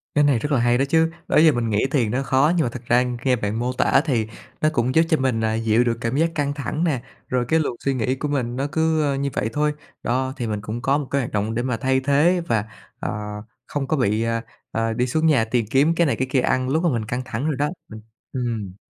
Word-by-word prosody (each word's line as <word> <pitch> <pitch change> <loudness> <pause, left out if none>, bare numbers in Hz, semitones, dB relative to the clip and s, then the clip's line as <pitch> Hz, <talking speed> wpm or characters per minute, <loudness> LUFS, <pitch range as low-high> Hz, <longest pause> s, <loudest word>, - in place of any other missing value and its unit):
Cái 145 - +4
này 140 -5 +3
rất 150 +6 -3
là 135 - +3
hay 120 0 +3
đó 135 - +2
chứ! 160 +1 +3 0.2
Đó - - +2
giờ 155 0 +7
mình 120 -4 -1
nghĩ 105 +4 +1
thiền 120 -7 +1
nó 135 +2 0
khó 135 +4 +3
nhưng 165 - +2
mà 120 - 0
thực 120 0 -9
ra 120 +1 +4 0.2
nghe 130 -2 +3
bạn 110 0 -2
mô 125 +1 -1
tả 130 - +3
thì 115 -7 0 0.3
nó 155 - +4
cũng 125 +1 0
giúp 160 - +7
cho 160 - +3
mình, 130 -4 0
à, 110 0 +1
dịu 115 +1 +2
được 115 -1 0
cảm 115 +4 -1
giác 165 +1 +2
căng 145 -1 0
thẳng 150 +3 -3
nè, 145 -8 0 0.3
rồi 125 -1 0
cái 160 +3 +3
luồng 145 -5 -1
suy 135 - +2
nghĩ 130 +1 0
của 150 - -3
mình 125 -4 -1
nó 135 +2 -1
cứ 160 -2 +1
như 140 +1 -1
vậy 110 - -1
thôi, 150 0 +1 0.3
đó. 130 +2 0
Thì 120 -3 -3
mình 105 -1 -3
cũng 110 +3 -5
có 135 +3 +2
một 145 -3 -4
cái 140 0 +2
hoạt 120 - -5
động 105 +2 -1
để 120 - -1
mà 125 -2 -1
thay 130 +3 +1
thế 150 +6 +3
và, 110 -6 +1 0.3
ờ, - - -3 0.6
không 140 -2 -3
có 155 - 0
bị, 110 -2 +1
à, 115 0 -1 0.3
à, 115 0 -1
đi 125 +2 0
xuống 155 +5 0
nhà 135 -8 +4
tìm 115 0 0
kiếm 150 +5 +3
cái 170 -2 +3
này - - +1
cái 130 - -2
kia 135 - +3
ăn 130 0 0
lúc 160 +5 +1
mà 175 - +3
mình 115 -6 -1
căng 125 +3 -3
thẳng 130 +2 -3
rồi 155 -3 0
đó, 145 +2 0 0.2
ừ, 110 - -7 0.4
ừm. 115 -7 -3
130 Hz, 275 wpm, -22 LUFS, 115-145 Hz, 0.6 s, giờ